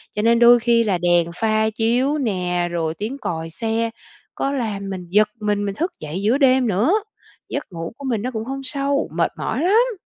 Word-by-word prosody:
Cho 210 - 0
nên 230 +1 +4
đôi 240 0 +7
khi 235 0 +3
là 200 -5 +1
đèn 175 -1 +2
pha 220 +2 +1
chiếu 240 +6 +1
nè, 180 -8 -1
rồi 165 -2 -1
tiếng 215 +11 -5
còi 165 -10 -4
xe 225 +6 -1 0.5
có 275 - -1
làm 210 -7 -3
mình 185 -2 -5
giật 210 +3 +4
mình, 205 -1 0
mình 200 -1 -3
thức 340 - -2
dậy 155 +5 -5
giữa 220 +6 +2
đêm 260 -3 +4
nữa. 215 - +2 0.6
Giấc 285 - -3
ngủ 165 +1 -6
của 280 - -9
mình 225 -4 0
nó 250 +4 -3
cũng 220 -2 -4
không 270 +2 -4
sâu, 280 +1 -1
mệt - - +1
mỏi - - -2
lắm! 450 +6 +3
220 Hz, 210 wpm, -21 LUFS, 190-260 Hz, 0.6 s, đôi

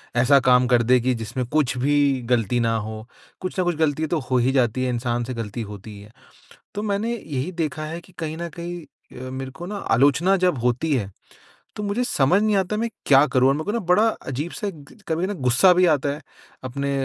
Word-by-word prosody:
ऐसा 135 +3 +5
काम 125 0 +5
कर 120 -2 +3
दें 125 +2 +4
कि 130 0 +2
जिसमें 115 +3 -4
कुछ 140 -3 0
भी 140 0 +2
गलती 120 0 +2
ना 115 -1 +1
हो। 110 +1 -6 0.4
कुछ 185 0 -4
न - - +3
कुछ 175 -2 0
गलती 155 0 +1
तो 165 0 0
हो 130 - +4
ही 125 +2 +2
जाती 130 -1 +1
है, - - 0
इंसान 120 0 -1
से 130 +2 -5
गलती 115 0 -5
होती 105 +2 -10
ही - - -11
है। 105 +2 -15 0.6
तो 205 - -2
मैंने 215 +3 -1
यही 150 - -4
देखा 155 -2 -3
है 165 +2 -5
कि 180 +1 -21
कहीं 160 0 -4
न 170 0 -5
कहीं 175 0 -6 0.4
अ, - - -6
मेरे 130 0 -6
को 170 +6 -9
ना 210 - -5 0.2
आलोचना 150 +9 +3
जब 180 -6 +1
होती 125 +6 0
है, 100 -6 -2 0.7
तो 210 - -4
मुझे 205 +4 -1
समझ 175 - +2
नहीं 215 -2 +2
आता 190 +2 0
है, - - -2
मैं 235 - 0 0.2
क्या 140 +1 +6
करूँ? 130 0 +3
और 135 - +3
मेरे 155 +1 -3
को 205 - -2
ना 235 - 0
बड़ा 210 +6 +4
अज़ीब-सा 160 - -4
एक 190 - -6 0.2
ग - - -17
कभी 165 +3 0
ना, 205 - -3
गुस्सा 130 +6 +4
भी 180 0 +4
आता 140 0 -2
है, 150 - -9 0.4
अपने 140 +2 -3
140 Hz, 235 wpm, -23 LUFS, 125-175 Hz, 0.7 s, क्या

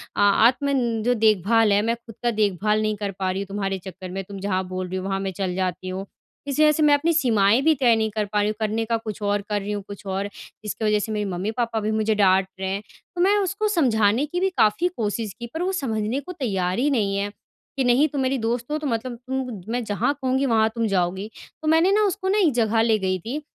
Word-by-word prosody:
अ - - -4 0.3
आत्मन 250 -2 +1
जो 245 - +3
देखभाल 220 0 +3
है, 205 - +4
मैं 230 +2 0
खुद 235 -1 -14
का 240 - +2
देखभाल 210 0 +1
नहीं 215 0 0
कर 200 -1 -3
पा 185 -1 0
रही 190 +1 -3
हूँ 200 - -6
तुम्हारे 195 -1 -2
चक्कर 185 0 -8
में, 195 +1 -4
तुम 195 +1 -9
जहाँ 190 -1 -1
बोल 185 0 -4
रही 185 +1 -4
हो, 185 - -4
वहाँ 195 0 -1
मैं 195 0 -3
चल 180 -1 -1
जाती 185 0 -2
हूँ। 190 +1 -4 0.4
इस 280 +1 -2
वजह 305 0 +6
से 305 +1 +1
मैं 295 -1 +6
अपनी 320 +4 +2
सीमाएँ 230 -6 +3
भी 320 +2 +4
तय 240 -3 +5
नहीं 220 -1 0
कर 215 0 -1
पा 210 +1 -1
रही 205 - +2
हूँ, 215 - -3
करने 220 +1 -1
का 230 0 0
कुछ 215 -2 -7
और, 205 0 0
कर 205 0 0
रही 205 - -4
हूँ 205 -1 -3
कुछ 200 0 -10
और। 195 +1 -2 0.3
इसकी 215 +1 -3
वजह 210 0 +3
से 220 +1 -4
मेरे 210 -1 -1
मम्मी-पापा 220 +5 -2
भी 215 +1 -1
मुझे 220 0 +1
डाँट 190 -2 +4
रहे 190 - -2
हैं। 195 +2 -2 0.3
तो 350 - -1
मैं 400 +3 +4
उसको 400 +2 0
समझाने 245 - +2
की 350 +4 -3
भी 385 +1 +2
काफ़ी 215 +12 +3
कोशिश 215 -1 -2
की, 235 - -5
पर 325 - -3
वो 375 - 0
समझने 220 0 -1
को 285 +6 -8
तैयार 195 - -1
ही 285 - +2
नहीं 210 -8 +1
है 200 +1 -1
कि, 265 +5 -8
"नहीं, 250 +5 +4
तुम 280 -2 -3
मेरी 265 +1 +1
दोस्त 240 +3 -2
हो, 305 - +1
तो 300 -2 -4
मतलब 235 0 -3
उम, 255 -7 -3
मैं 245 +1 -1
जहाँ 215 +6 0
कहूँगी, 265 +1 +1
वहाँ 220 -3 +3
तुम 230 -1 0
जाओगी।" 190 +2 -1 0.3
तो 310 - -4
मैंने 325 +4 +4
ना 425 +1 +3
उसको 380 0 -3
ना 410 - +2
एक 350 -7 +4
जगह 225 -1 +2
ले 225 -1 +3
गई 185 -1 -1
थी 255 - -5
220 Hz, 255 wpm, -23 LUFS, 200-260 Hz, 0.4 s, वजह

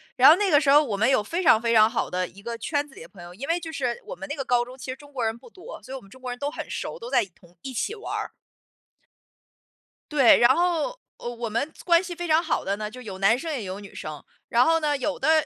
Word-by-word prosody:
然 260 +3 +8
后 315 - +9
那 405 -2 +1
个 295 -1 +5
时 275 - +1
候 285 - +8
儿 - - +2
我 225 -8 -2
们 215 +5 +2
有 260 -5 +3
非 335 - -3
常 225 -8 +6
非 235 -1 +1
常 215 0 +7
好 235 - -2
的 180 0 -1
一 200 - -15
个 230 +2 -5
圈 290 +5 -2
子 270 - -19
里 - - -11
的 - - -11
朋 195 - -14
友， 175 0 -11
因 250 +9 -7
为 335 +1 +1
就 325 -1 -7
是 250 -5 -2
我 - - -7
们 290 - -8
那 290 - -3
个 275 - -3
高 245 -1 +2
中 250 +2 -11
其 255 - -9
实 - - -5
中 290 +1 -16
国 255 -4 -3
人 225 +1 -1
不 350 - -16
多， 450 +5 -11
所 - - -12
以 - - -4
我 265 - -7
们 195 - -18
中 260 +6 -16
国 250 -1 -5
人 245 - -7
都 285 0 -1
很 - - -7
熟， - - -5
都 475 0 -8
在 240 - +3
同 175 -1 -23
一 270 -2 -7
起 405 - -2
玩 430 - -7
儿。 - - -4 1.8
对， 275 -5 +6
然 240 - +6
后， 355 +8 0 0.2
呃， - - -8
我 235 -1 -5
们 235 +8 -2
关 340 0 +4
系 360 -1 -6
非 350 0 -5
常 315 0 +4
好 335 - -1
的 195 - -1
呢， 210 0 -5
就 255 +3 -11
有 200 -6 -7
男 200 +5 +4
生 325 +3 -4
也 265 -7 -3
有 190 0 -6
女 200 -1 -12
生。 155 -2 -7 0.3
然 240 +1 +4
后 325 0 +3
呢， 300 -2 +1
有 290 +1 -2
的 315 -1 +3
260 Hz, 325 characters per minute, -25 LUFS, 225-315 Hz, 1.8 s, 后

